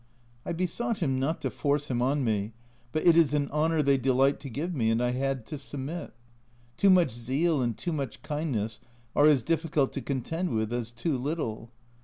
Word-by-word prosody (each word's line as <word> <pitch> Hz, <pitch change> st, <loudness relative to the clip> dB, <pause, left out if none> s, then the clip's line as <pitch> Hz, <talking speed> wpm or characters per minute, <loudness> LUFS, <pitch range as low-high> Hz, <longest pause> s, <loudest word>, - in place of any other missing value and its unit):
I -, -, -1 dB
besought 185 Hz, +7 st, -1 dB
him 135 Hz, -8 st, 0 dB
not 150 Hz, +5 st, -1 dB
to -, -, -2 dB
force 145 Hz, -1 st, 0 dB
him 120 Hz, -1 st, 0 dB
on 135 Hz, +3 st, +1 dB
me, 110 Hz, -2 st, -1 dB, 0.4 s
but 155 Hz, -, -1 dB
it 170 Hz, -2 st, +7 dB
is 160 Hz, -3 st, +4 dB
an 145 Hz, -1 st, 0 dB
honour 155 Hz, +1 st, +2 dB
they 140 Hz, -1 st, +3 dB
delight 135 Hz, +2 st, +3 dB
to 140 Hz, -, -8 dB
give 155 Hz, +9 st, -3 dB
me, 115 Hz, -7 st, +1 dB
and 115 Hz, +1 st, +2 dB
I 125 Hz, 0 st, +1 dB
had 135 Hz, -1 st, -1 dB
to 150 Hz, +5 st, -6 dB
submit. 145 Hz, +5 st, -6 dB, 0.6 s
Too 200 Hz, -, +4 dB
much 180 Hz, -7 st, +5 dB
zeal 135 Hz, +7 st, 0 dB
and 120 Hz, -3 st, -1 dB
too 175 Hz, -, -3 dB
much 140 Hz, -7 st, -4 dB
kindness 130 Hz, -8 st, -2 dB, 0.4 s
are 145 Hz, -, +6 dB
as 140 Hz, -6 st, +4 dB
difficult 160 Hz, -4 st, +1 dB
to 135 Hz, -, -3 dB
contend 160 Hz, +8 st, -2 dB
with 110 Hz, +1 st, -1 dB
as 120 Hz, -2 st, -2 dB
too 120 Hz, +6 st, -2 dB
little. 125 Hz, -6 st, -3 dB
140 Hz, 200 wpm, -28 LUFS, 125-160 Hz, 0.6 s, it